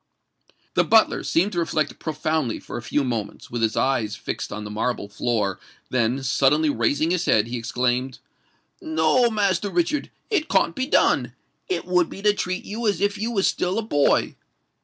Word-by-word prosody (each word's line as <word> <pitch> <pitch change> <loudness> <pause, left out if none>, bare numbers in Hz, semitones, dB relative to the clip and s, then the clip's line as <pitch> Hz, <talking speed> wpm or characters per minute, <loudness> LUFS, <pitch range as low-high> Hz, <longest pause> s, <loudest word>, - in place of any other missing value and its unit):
The - - +3
butler 225 -1 +4
seemed 185 +5 +1
to 175 - -2
reflect 155 -2 -1
profoundly 155 -5 -1
for - - -9
a - - -4
few 140 +5 0
moments, 115 -5 -4
with 120 -1 -3
his 110 -1 0
eyes 115 -6 +1
fixed 115 - -5
on 105 +1 -5
the 105 - -7
marble 110 0 -2
floor 105 -2 -1 0.3
then, 125 +2 +1
suddenly 145 +3 +3
raising 145 +7 +1
his 180 -1 0
head, 105 -1 +3
he 120 +1 -4
exclaimed, 125 +2 -1 0.6
"No, 160 +10 +2
Master 205 -2 0
Richard—it 295 - -1
can't - - +2
be 260 -1 -2
done! - - +2 0.4
It 375 - -1
would 180 -2 +2
be 195 - -9
to 210 -1 +5
treat 185 -2 -3
you 225 +2 -3
as 205 - +1
if 205 0 0
you 220 +2 -1
was 200 -5 +1
still 180 +3 0
a 225 - 0
boy. 145 -10 +2
155 Hz, 180 wpm, -23 LUFS, 120-200 Hz, 0.6 s, to